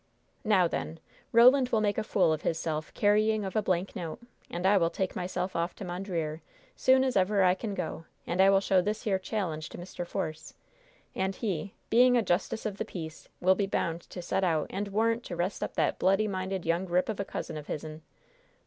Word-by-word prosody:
"Now, 195 -5 +4
then, 165 0 -4 0.3
Roland 250 +2 +6
will 225 - +2
make 205 -1 +1
a - - -1
fool 180 -6 +2
of 155 - -3
hisself 155 -1 -2
carrying 215 0 +3
of 190 - -5
a 215 - +3
blank 185 0 -1
note. 170 -5 -5 0.3
And 175 +2 -4
I 200 +2 +5
will 165 -3 +3
take 190 +1 -3
myself 185 +1 -3
off 170 +1 -1
to 195 - -7
Mondreer, 175 -4 -3 0.3
soon 260 0 +4
as 260 -1 0
ever 195 +1 +3
I 180 -1 +5
can 200 +1 -4
go, 165 -2 -4 0.2
and 175 +2 +1
I 195 - +7
will 195 0 +5
show 190 -2 +3
this 210 +3 -2
here 195 -3 +1
challenge 180 -6 -3
to - - -9
Mr. 175 0 -6
Force. 155 -2 -5 0.6
And 190 0 -1
he, 195 -2 -3 0.2
being 245 +2 +6
a 235 - +2
justice 185 +4 -1
of 205 -2 -3
the - - -1
peace, 160 -3 -8
will 185 +1 +5
be 195 +1 -1
bound 170 -3 -1
to 180 - -7
send 190 - 0
out 160 -4 0
a 195 - -2
warrant 230 +3 +1
to 175 - -5
'rest 175 +3 -2
up - - -4
that - - +1
bloody 195 +3 +3
minded 190 -2 -3
young 170 +3 0
rip 180 +1 +1
of 215 -3 -3
a - - +1
cousin 165 - -5
of 150 -1 -7
hizzen! 155 +1 -6
190 Hz, 215 wpm, -29 LUFS, 170-210 Hz, 0.6 s, I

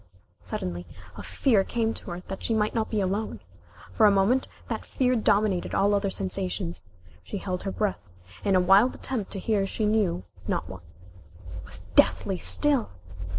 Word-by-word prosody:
Suddenly 90 0 -5 0.3
a 100 - -7
fear 195 - +2
came 225 +1 -1
to - - -9
her 175 +1 -5
that 190 +1 -7
she 225 - 0
might 210 -1 +1
not 225 -2 -1
be 215 - 0
alone. 200 +3 -2 0.5
For 215 - +5
a - - +6
moment 200 +7 +2 0.2
that - - -3
fear 255 -1 +1
dominated 205 -4 +1
all 200 +1 +3
other 200 -1 +1
sensations. 185 -2 -3 0.4
She 205 - -5
held 185 -2 -3
her 195 - -3
breath, 195 - -2 0.3
in 195 - +2
a - - +6
wild 195 +7 +5
attempt 230 -7 -3
to 195 - -4
hear 200 -1 0
she 215 - -2
knew 210 - +1 0.2
not - - -1
what. 95 -1 -9 0.7
It 90 - -9
was 85 0 -4
deathly 95 - +4
still! 290 -5 +3
195 Hz, 175 wpm, -26 LUFS, 180-220 Hz, 0.7 s, a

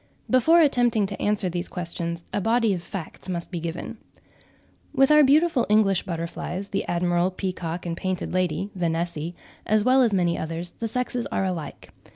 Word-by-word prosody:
Before 315 +7 +5
attempting 245 -7 +3
to 195 0 -5
answer 205 -2 +1
these 175 0 -2
questions 170 -1 -4
a 205 - 0
body 225 0 +2
of 175 - -3
facts 175 +1 -8
must 170 -1 -4
be 175 - -3
given. 170 +7 -5 1.0
With 270 +2 +5
our 300 0 +7
beautiful 290 -1 +3
English 205 -3 +3
butterflies, 175 +3 -4
the 195 - -1
admiral, 175 +1 +1
peacock, 180 -2 -4
and 170 -1 -2
painted 185 0 -3
lady 185 +2 -1
(Vanessae), 170 -1 -2 0.3
as 215 -1 +3
well 260 +1 +5
as 235 -3 +3
many 175 -3 +1
others, 165 +2 -4
the 230 - -4
sexes 250 +1 -2
are - - -1
alike. 175 -5 -5
185 Hz, 170 wpm, -25 LUFS, 170-225 Hz, 1.0 s, our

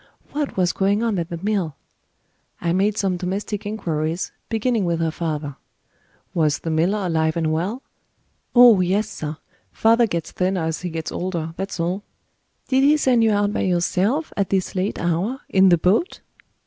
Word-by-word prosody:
What 290 -5 -3
was 180 -2 +2
going 200 +3 +1
on 220 -5 0
at 170 - -3
the 170 - -4
mill? 195 -8 -1 0.8
I 170 -1 0
made 200 +3 +1
some 190 -3 0
domestic 200 +3 -3
inquiries, 165 -5 -2 0.2
beginning 225 -1 0
with 170 -2 0
her 165 -1 0
father. 150 -4 -4 0.8
Was 155 -4 +2
the 165 - -4
miller 185 +6 +1
alive 160 -2 0
and 160 -1 0
well? 195 +11 -2 0.7
"Oh 240 -4 +8
yes, 195 +4 +1
sir. 155 -7 -6 0.3
Father 230 +1 +3
gets 170 -4 -3
thinner 185 -1 0
as 160 0 -2
he 180 - -3
gets 160 -1 -5
older 170 -3 -3
that's 195 -1 -5
all." 175 +4 -1 0.7
"Did 265 -1 +3
he 295 +2 +5
send 250 -5 +3
you 220 - +4
out 205 0 +1
by - - -1
yourself, 190 - 0
at 200 -2 0
this 190 -2 0
late 190 +2 -1
hour, 175 - -1
in 190 0 +5
the 175 - +5
boat?" 200 - +1
185 Hz, 175 wpm, -22 LUFS, 165-210 Hz, 0.8 s, Oh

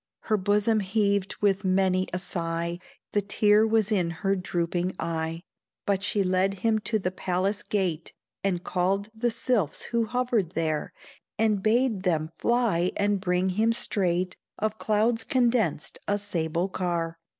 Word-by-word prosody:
Her 215 - +1
bosom 210 +3 +2
heaved 200 -1 0
with 200 -1 +2
many 185 0 +2
a 180 - -1
sigh, 170 -1 -3 0.3
The 205 - +2
tear 210 +2 +3
was 220 -1 +2
in 180 -5 +2 0.2
her 195 0 +3
drooping 175 0 -2
eye; 165 0 -3 0.4
But 195 -1 +1
she 205 0 +1
led 185 +1 +1
him 220 -1 +3
to 220 - +2
the 185 -3 -2
palace 185 +2 -1
gate, 180 -6 -2 0.3
And 180 -3 0
called 195 +3 0
the 235 +2 0
sylphs 220 - -1
who 235 -1 0
hovered 235 -6 0
there, 155 -3 -1 0.5
And 215 -2 +2
bade 225 -1 +2
them 160 -4 0
fly 230 -8 +2
and 205 -1 +1
bring 180 0 +1
him 220 +5 +2
straight 185 -5 0 0.2
Of 215 0 -2
clouds 225 +2 +1
condensed 235 - +1
a 205 - +2
sable 175 -3 -1
car. 170 -3 -2
195 Hz, 150 wpm, -27 LUFS, 180-215 Hz, 0.5 s, tear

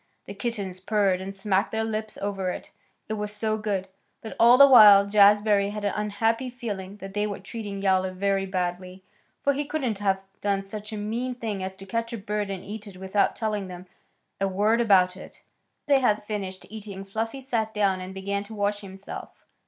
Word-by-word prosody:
The 200 - -7
kittens 200 -4 -4
purred 195 -2 +1
and 195 +1 -6
smacked 195 -1 0
their 220 0 -1
lips 215 -1 -4
over 195 -2 -1
it, - - -6 0.4
it 220 - -3
was 210 -1 -3
so 215 +1 -2
good, 200 -3 -2 0.3
but 220 - -8
all 240 +2 +7
the 280 - +10
while 210 -7 +9
Jazbury 205 0 +5
had 210 0 -5
an 205 - 0
unhappy 225 +4 0
feeling 205 -6 -6
that 195 -1 -9
they 210 +1 0
were 205 - -4
treating 205 -4 -6
Yowler 190 -1 +2
very 195 +1 0
badly, 185 0 -3 0.4
for 280 - +3
he 285 +2 -1
couldn't 270 -8 -2
have 195 -2 +1 0.2
done 200 -1 0
such 210 +2 -8
a 215 - -4
mean 235 +5 -3
thing 220 -5 -4
as 190 0 -4
to 195 0 -11
catch 230 +4 -2
a - - -3
bird 210 0 -3
and 195 -1 -5
eat 210 +1 -7
it 190 -2 -11
without 190 +2 +1
telling 210 -3 -2
them 180 0 -9 0.5
a 195 - +1
word 210 +5 +2
about 185 -5 +4
it. - - -11 0.5
After 290 - +1
they 275 - +6
had 215 -5 +2
finished 195 -3 -5
eating 200 -3 -8
Fluffy 225 +6 -3
sat 230 -5 -2
down 200 -3 +1
and 185 +1 -7
began 200 +1 -3
to 220 +2 -10
wash 205 0 0
himself. 195 -1 -10
205 Hz, 200 wpm, -26 LUFS, 195-220 Hz, 0.5 s, the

